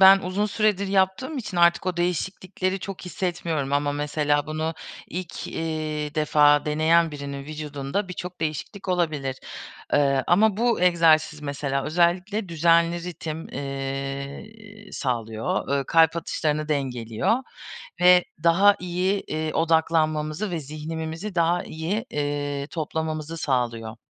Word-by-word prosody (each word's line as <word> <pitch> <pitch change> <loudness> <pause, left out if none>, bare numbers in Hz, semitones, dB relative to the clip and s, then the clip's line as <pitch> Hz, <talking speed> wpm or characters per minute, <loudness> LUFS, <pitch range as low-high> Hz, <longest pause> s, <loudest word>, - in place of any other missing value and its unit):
ben 190 0 +9
uzun 195 +3 -1
süredir 210 -2 +1
yaptığım 195 +10 +1
için 205 -7 -5
artık 170 +1 +4
o 180 -1 -1
değişiklikleri 185 +2 -1
çok 195 0 -7
hissetmiyorum. 170 -6 -2
Ama 145 0 +1
mesela 145 0 0
bunu 155 +1 -2 0.3
ilk, 180 -1 -6
eee, 155 -2 -3
defa 150 -1 +4
deneyen 160 +2 +3
birinin 140 -1 -6
vücudunda 150 +4 -4
birçok 180 0 -7
değişiklik 165 +6 -4
olabilir. 155 -7 0 0.6
Eee, 140 -2 +3
ama 205 +3 +4
bu 235 -1 +1
egzersiz 165 -3 +4
mesela 140 -1 -2
özellikle 180 +5 +1
düzenli 170 +1 +3
ritim, 160 -2 -6
eee, 140 +10 -6
sağlıyor, 115 -4 -2
eee, 135 - -2
kalp 165 0 +4
atışlarını 155 -2 -1
dengeliyor 125 - 0 0.6
ve 180 0 +7 0.2
daha 195 +5 +6
iyi, 180 +3 0
eee, 155 0 -3
odaklanmamızı 160 +2 +1
ve 170 - -2
zihnimizi 160 +6 -5
daha 170 +1 +2
iyi, 175 +8 -3
eee, 145 -1 -2
toplamamızı 160 0 -3
sağlıyor. 120 -6 -1
160 Hz, 120 wpm, -25 LUFS, 145-180 Hz, 0.6 s, ben